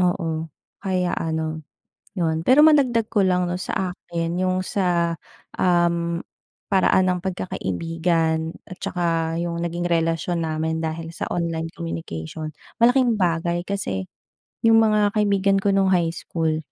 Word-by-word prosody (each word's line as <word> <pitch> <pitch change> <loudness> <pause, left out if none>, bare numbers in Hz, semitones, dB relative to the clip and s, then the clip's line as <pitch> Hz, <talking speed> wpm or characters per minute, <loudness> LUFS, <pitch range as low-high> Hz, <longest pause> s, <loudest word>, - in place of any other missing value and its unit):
oo. 165 -3 0 0.3
Kaya 185 -3 0
ano, 160 -1 -2 0.6
'yon, 160 -3 0
pero 270 +4 +7
madagdag 255 -8 +4
ko 210 - +2
lang, 180 -2 +2
'no, 180 - -2
sa 185 0 -2
akin, 170 -2 -4
'yong 185 0 +1
sa, 175 -3 +1 0.5
um, 170 -1 +2 0.5
paraan 190 -1 +4
ng 180 - -1
pagkakaibigan 165 - -1
at 185 - -11
saka 165 -2 -1
'yong 170 0 -2
naging 170 0 -2
relasyon 165 +1 0
namin 160 +1 -1
dahil 160 0 -4
sa - - -4
online 165 -1 -2
communication, 155 - -5 0.3
malaking 240 -2 +4
bagay. 170 -1 +1
Kasi, 100 - -3 0.6
'yong 225 0 +6
mga 215 -2 +4
kaibigan 200 -1 +3
ko 195 0 +1
no'ng 195 -1 +3
high 170 -3 +2
school, 160 -2 -1
175 Hz, 135 wpm, -23 LUFS, 165-190 Hz, 0.6 s, pero